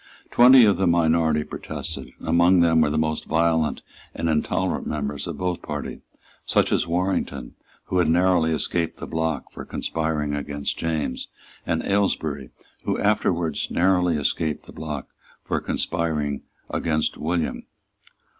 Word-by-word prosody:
Twenty 125 0 +8
of 100 -4 +3
the 95 0 +2
minority 80 -2 +3
protested, - - -5
and - - -10
among 85 +2 +5
them 80 -1 +4
were 75 - +3
the 75 - -1
most 80 0 -1
violent 80 -1 +1 0.3
and 85 - -2
intolerant 75 -1 0
members 75 -1 -3
of - - -5
both 90 -1 -2
parties, 75 -1 -5 0.4
such - - +2
as - - +1
Warrington, 90 -7 -1 0.3
who 90 - -1
had 85 -3 +3
narrowly 85 -1 +3
escaped 80 +2 -1
the - - -6
block 80 -1 -2
for - - -8
conspiring 80 -2 -2
against 75 0 -3
James, 80 -5 -2 0.4
and 80 -1 0
Aylesbury, 80 -9 0 0.3
who - - -1
afterwards 85 -6 0
narrowly 90 -2 +2
escaped 75 +1 -1
the - - -13
block 75 -3 -6 0.3
for - - -1
conspiring 75 -4 -1 0.3
against 80 -2 0
William. 85 +1 -2
80 Hz, 140 wpm, -24 LUFS, 75-85 Hz, 0.4 s, Twenty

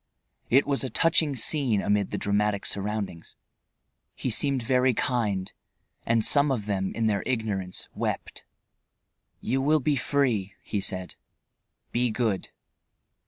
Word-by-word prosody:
It 135 +4 +5
was 140 -1 0
a 130 - -2
touching 155 +2 +2
scene, 125 -3 +2
amid 100 0 +1
the - - -3
dramatic 100 0 0
surroundings. 100 -4 -3 0.8
He 130 - -2
seemed 135 +2 +2
very 125 +1 +2
kind, 105 -8 -1 0.5
and 115 -1 +2
some 145 0 +4
of 115 -6 -1
them 95 -2 -1
in 115 - 0
their 105 -3 +1
ignorance 105 -7 -2
wept. - - -4 1.0
"You 130 +3 0
will 155 +3 +3
be 145 +1 +1
free," 120 -8 0
he 105 - -2
said. 95 -2 -2 0.8
"Be 120 +1 +1
good." 110 -4 -1
115 Hz, 130 wpm, -26 LUFS, 100-130 Hz, 1.0 s, It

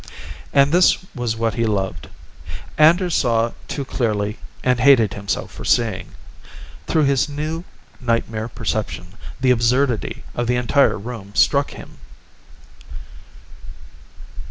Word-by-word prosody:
And 140 0 +4
this 180 +2 +5 0.2
was 120 -4 -2
what 115 0 0
he 115 -1 0
loved. 95 -7 -2 0.7
Anders 170 +3 +4
saw 115 -4 +2 0.2
too 140 - -4
clearly 105 -4 -2 0.2
and 125 -1 +2
hated 125 -6 +5
himself 100 -1 -3
for - - -9
seeing. 105 -7 0 0.7
Through 155 - +2
his 140 +1 +2
new 155 +4 -4 0.3
nightmare 115 -2 -1
perception, 110 -6 -4 0.3
the 130 -1 +3
absurdity 125 0 +1
of 120 -1 -2
the 125 - +2
entire 125 +3 +2
room 105 -2 -8
struck 140 0 +3
him. - - -12
120 Hz, 115 wpm, -20 LUFS, 110-140 Hz, 0.7 s, this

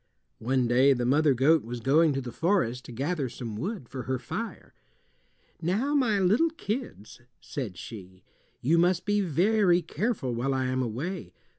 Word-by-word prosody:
One 125 +1 +1
day 130 +4 +5
the 125 -2 -2
mother 145 +2 +3
goat 150 +5 +4
was 120 +2 -6
going 150 +7 +4
to 135 - -2
the 125 -2 -6
forest 125 - 0
to - - -9
gather 140 +3 -2
some 115 -3 -6
wood 175 - -4
for 130 - -6
her 130 - +1
fire. 225 - -6 0.9
"Now, 210 - 0
my 250 -8 +2
little 205 - +3
kids," 215 - -6 0.2
said 115 -11 -6
she, 95 -5 -10 0.4
"you 160 +7 +3
must 175 +1 +2
be 205 0 +2
very 180 +1 +3
careful 165 - -2
while 130 +4 -1
I 130 -1 0
am 130 0 0
away. 125 - -4
140 Hz, 165 wpm, -27 LUFS, 125-185 Hz, 0.9 s, day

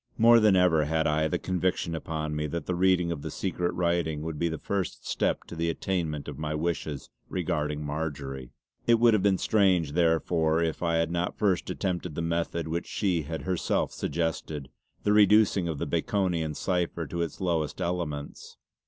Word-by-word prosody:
More 115 +1 +7
than 105 -3 +5
ever 85 -4 +4
had 80 +1 0
I 80 +1 +2
the - - 0
conviction 90 -2 -1
upon 80 -1 -3
me 75 0 -1
that 85 +1 -4
the 90 - -1
reading 90 -1 +3
of 80 -4 -4
the - - -5
secret 90 -2 -2
writing 85 -3 0
would 80 -2 -4
be 85 - +1
the 80 - -3
first 95 +3 -3
step - - 0
to - - -10
the 85 0 0
attainment 80 -4 -2
of - - -7
my 75 0 -2
wishes 80 -3 -3 0.2
regarding 75 0 -2
Marjory. 70 -4 -4 0.4
It 120 - +6
would 115 0 +5
have 105 - +3
been 95 -1 +3
strange 95 -9 +2
therefore 80 0 +2
if 80 -1 -2
I 85 -1 +1
had 80 0 +1
not 85 +1 -2
first 95 -4 +1
attempted 90 -4 -2
the 85 - -2
method 85 0 -1
which 85 +2 -3
she 90 -5 0
had 80 +2 -5
herself 90 -2 0
suggested, 80 -3 -3 0.3
the 105 - +3
reducing 105 -2 +5
the 80 -4 -2
Baconian 85 -6 0
cipher 85 -2 -1
to 85 +3 -4
its 85 - -3
lowest 85 -5 -1
elements. 80 -5 -4
85 Hz, 180 wpm, -28 LUFS, 80-90 Hz, 0.4 s, More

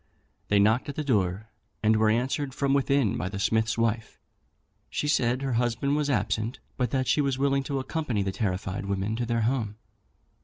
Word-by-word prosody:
They 100 - +3
knocked 110 +7 +3
at 140 - -5
the 155 - -2
door, 105 -5 0 0.3
and 110 +1 +4
were 110 0 +3
answered 130 +4 0
from 140 -1 +1
within 140 -5 +2
by 95 - -2
the 100 - -5
smith's 110 +3 +1
wife. 115 -1 -1 0.7
She 150 - -2
said 130 -2 +1
her 135 -2 -1
husband 120 +4 0
was 150 -1 0
absent, 115 -3 0 0.2
but 125 -2 0
that 130 +1 0
she 150 - +3
was 135 -2 0
willing 140 0 +2
to 140 0 -2
accompany 130 -5 -1
the 95 - -1
terrified 95 0 -2
women 100 +2 -1
to 120 -1 -2
their 115 0 +1
home. 110 -3 0
120 Hz, 190 wpm, -27 LUFS, 110-135 Hz, 0.7 s, and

